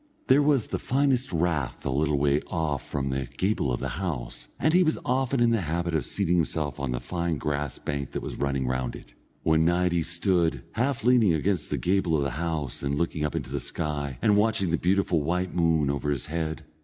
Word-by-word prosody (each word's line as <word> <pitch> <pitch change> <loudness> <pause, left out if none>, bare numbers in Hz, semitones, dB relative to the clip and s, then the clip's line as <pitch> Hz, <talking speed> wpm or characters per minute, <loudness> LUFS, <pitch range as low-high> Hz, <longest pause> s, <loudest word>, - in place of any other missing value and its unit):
There 135 +3 +6
was 145 -5 +3
the - - -2
finest 130 -2 +1
rath 80 -5 -1
a 70 - 0
little 75 +2 +1
way 70 +1 +2
off 80 -5 -2
from 70 -1 -2
the 65 -1 -2
gable 95 -9 +1
of - - -1
the - - -2
house, 70 -11 -4
and 155 +3 +2
he 180 - +6
was 160 -3 +2
often 130 +1 +1
in 120 -1 +4
the 115 -3 +2
habit 85 +1 -2
of 80 - 0
seating 90 -3 +1
himself 75 -1 -1
on 70 -1 -2
the 60 0 -1
fine 85 +5 -2
grass 75 -1 -2
bank 70 -2 -4
that - - -3
was - - -5
running 70 -2 0
round 65 -1 -2
it. - - -13 0.3
One 80 0 +3
night 90 +1 +2
he 85 -1 +1
stood, 85 - +1
half 125 0 -1
leaning 115 -8 +5
against 90 +2 -1
the - - -1
gable 90 -3 +1
of 70 - 0
the 70 - -1
house, 75 -2 -3
and 70 0 -1
looking 80 -1 -1
up 75 - -1
into 65 - -4
the 70 - -1
sky, 70 +1 -3
and 105 - +5
watching 105 -4 +2
the 85 - +2
beautiful 90 -3 +2
white 90 +4 -1
moon 80 -4 +2
over 70 +1 -2
his 70 -4 -1
head. 80 0 -3
80 Hz, 220 wpm, -27 LUFS, 70-95 Hz, 0.3 s, There